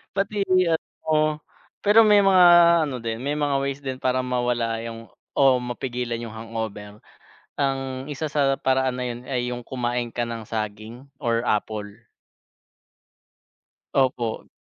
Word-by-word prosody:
Pati 200 Hz, +1 st, 0 dB
GF 180 Hz, -3 st, +3 dB, 0.2 s
mo. 155 Hz, -1 st, +1 dB, 0.4 s
Pero 210 Hz, +2 st, +7 dB
may 210 Hz, -1 st, +6 dB
mga 190 Hz, -2 st, +6 dB, 0.4 s
ano 130 Hz, -3 st, -4 dB
din, 115 Hz, -1 st, -3 dB
may 145 Hz, +2 st, -1 dB
mga 145 Hz, -2 st, 0 dB
ways 140 Hz, 0 st, -3 dB
din 130 Hz, -1 st, -4 dB
para 130 Hz, 0 st, 0 dB
mawala 120 Hz, -2 st, -1 dB
'yung, 115 Hz, 0 st, -8 dB, 0.3 s
oh, 135 Hz, -2 st, +5 dB
mapigilan 125 Hz, -1 st, -4 dB
'yung 115 Hz, -2 st, -7 dB
hangover. 110 Hz, -2 st, -6 dB, 0.6 s
Ang 135 Hz, -1 st, -2 dB
isa 145 Hz, +2 st, -3 dB
sa 140 Hz, -2 st, +2 dB
paraan 130 Hz, -1 st, +1 dB
na 125 Hz, -, -3 dB
'yun 120 Hz, -1 st, -5 dB
ay 125 Hz, -3 st, -1 dB
'yung 120 Hz, 0 st, -5 dB
kumain 120 Hz, -2 st, -2 dB
ka 120 Hz, -, -3 dB
ng 115 Hz, -1 st, -5 dB
saging 110 Hz, +3 st, -5 dB, 0.2 s
or 115 Hz, -2 st, +1 dB
apple. 105 Hz, -1 st, -1 dB, 2.1 s
Opo. 125 Hz, -4 st, 0 dB
125 Hz, 140 wpm, -24 LUFS, 115-140 Hz, 2.1 s, Pero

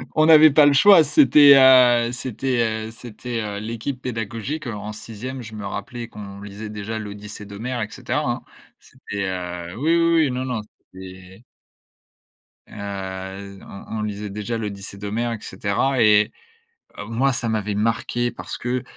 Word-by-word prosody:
On 155 Hz, -1 st, +4 dB
n'avait 155 Hz, -1 st, +8 dB
pas 145 Hz, +1 st, +6 dB
le 145 Hz, -, +6 dB
choix 185 Hz, +2 st, +7 dB
c'était, 150 Hz, -, +7 dB
heu, 125 Hz, -3 st, +6 dB
c'était, 120 Hz, -3 st, -2 dB
heu, -, -, -9 dB
c'était, 120 Hz, 0 st, -6 dB
heu, 105 Hz, -1 st, -4 dB
l'équipe 115 Hz, +4 st, -5 dB
pédagogique, 115 Hz, +5 st, -4 dB
heu, 120 Hz, -, -4 dB
en 105 Hz, +1 st, -6 dB
6e 120 Hz, +5 st, -7 dB
je 110 Hz, -1 st, -10 dB
me 105 Hz, -, -7 dB
rappelais 120 Hz, +4 st, -6 dB
qu'on 100 Hz, -3 st, -10 dB
lisait 105 Hz, +1 st, -8 dB
déjà 105 Hz, +1 st, -5 dB
l'Odyssée 105 Hz, 0 st, -8 dB
d'Homère 115 Hz, +5 st, -5 dB
et 105 Hz, -, -3 dB
cetera -, -, -3 dB
hein. -, -, -3 dB, 0.4 s
C'était, 100 Hz, -1 st, -7 dB
heu, 90 Hz, -1 st, -5 dB
oui, 160 Hz, +5 st, +2 dB
oui, 170 Hz, 0 st, +3 dB
oui, 135 Hz, -, -1 dB
non, 130 Hz, +1 st, -3 dB
non 125 Hz, -4 st, -3 dB, 0.3 s
et 95 Hz, +2 st, -12 dB, 1.3 s
heu, 95 Hz, -1 st, -7 dB
on 105 Hz, +2 st, -8 dB
on -, -, -2 dB
lisait 105 Hz, 0 st, -5 dB
déjà 105 Hz, +3 st, -4 dB
l'Odyssée 100 Hz, -2 st, -6 dB
d'Homère 110 Hz, +4 st, -3 dB
et -, -, -4 dB
cetera 105 Hz, +7 st, -1 dB
et 105 Hz, +1 st, +4 dB, 0.7 s
heu, 105 Hz, -, -6 dB
moi 125 Hz, +4 st, +1 dB
ça 120 Hz, -1 st, -2 dB
m'avait 105 Hz, -2 st, -2 dB
marqué. 115 Hz, +2 st, -1 dB
Parce -, -, -7 dB
que, 125 Hz, +1 st, -2 dB
110 Hz, 165 wpm, -22 LUFS, 100-125 Hz, 1.3 s, n'avait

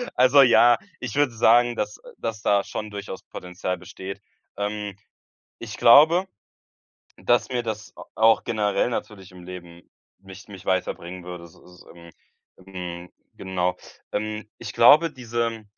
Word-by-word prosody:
Also, 130 Hz, +2 st, +6 dB
ja, 120 Hz, -1 st, +6 dB, 0.2 s
ich 125 Hz, -4 st, -5 dB
würde 145 Hz, -4 st, +2 dB
sagen, 120 Hz, +2 st, +4 dB
dass, 105 Hz, 0 st, -3 dB
äh -, -, -15 dB
dass 110 Hz, -2 st, -5 dB
da 100 Hz, -1 st, +2 dB
schon 105 Hz, 0 st, -6 dB
durchaus 100 Hz, -2 st, -7 dB
Potenzial 90 Hz, 0 st, -5 dB
besteht. 95 Hz, +2 st, -9 dB, 0.4 s
Ähm. 105 Hz, -1 st, -4 dB, 0.6 s
Ich 110 Hz, -2 st, -8 dB
glaube, 160 Hz, +10 st, +6 dB, 0.9 s
dass 120 Hz, 0 st, +1 dB
mir 125 Hz, -2 st, -1 dB
das 110 Hz, -1 st, -6 dB
a -, -, -10 dB
auch 110 Hz, 0 st, +4 dB
generell 110 Hz, +1 st, 0 dB
natürlich 105 Hz, -5 st, -6 dB
im 90 Hz, -1 st, -13 dB
Leben 85 Hz, -1 st, -11 dB, 0.3 s
mich 95 Hz, +1 st, -14 dB
mich 95 Hz, -2 st, -12 dB
weiterbringen 90 Hz, -1 st, -2 dB
würde 90 Hz, -1 st, -8 dB
s 85 Hz, -, -15 dB
so, 90 Hz, 0 st, -18 dB
ähm. 85 Hz, 0 st, -14 dB, 0.5 s
Hm, 90 Hz, -2 st, -8 dB, 0.2 s
genau. 90 Hz, -1 st, -2 dB, 0.4 s
Ähm, 105 Hz, 0 st, -4 dB
ich -, -, -7 dB
glaube, 155 Hz, +7 st, +6 dB
diese 115 Hz, -2 st, -3 dB
105 Hz, 145 wpm, -24 LUFS, 90-115 Hz, 0.9 s, Also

